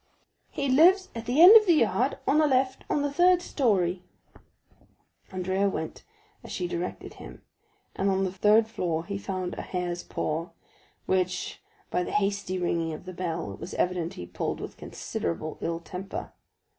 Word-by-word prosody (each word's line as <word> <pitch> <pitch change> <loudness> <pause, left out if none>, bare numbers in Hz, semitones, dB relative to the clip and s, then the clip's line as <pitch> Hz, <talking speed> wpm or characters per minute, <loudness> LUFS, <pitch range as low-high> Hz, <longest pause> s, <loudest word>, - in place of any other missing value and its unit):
"He 280 - -3
lives 360 +8 +5
at 230 -1 -7
the 250 +5 +1
end 390 +5 +11
of 430 -2 +8
the 340 - +6
yard, - - +1
on 305 - +4
the 310 - +4
left, 260 -1 +1
on 290 - +1
the 285 -1 -2
third 355 +3 +5
story." 195 - 0 1.3
40132m - - -20
Andrea 190 +2 0
went 160 -4 -5 0.4
as - - -10
she 180 - -2
directed 175 +1 -5
him, - - -12 0.5
and 195 - +1
on 190 0 +1
the 190 - -1
third 210 +4 +4
floor 170 -7 -2
he 200 +1 -4
found 185 -2 -4
a - - -5
hare's 175 -1 -3
paw, 160 +3 -3 0.6
which, 185 -1 -1 0.3
by 180 - +1
the - - -3
hasty 200 -2 0
ringing 170 -2 -1
of 155 - -9
the 185 - -7
bell, 170 - -3
it - - -12
was 170 +3 -7
evident 180 -2 -1
he 90 - -7
pulled 90 - -4
with - - -7
considerable 155 - -5
ill 165 0 -2
temper. 180 +3 -7
185 Hz, 175 wpm, -27 LUFS, 175-250 Hz, 1.3 s, end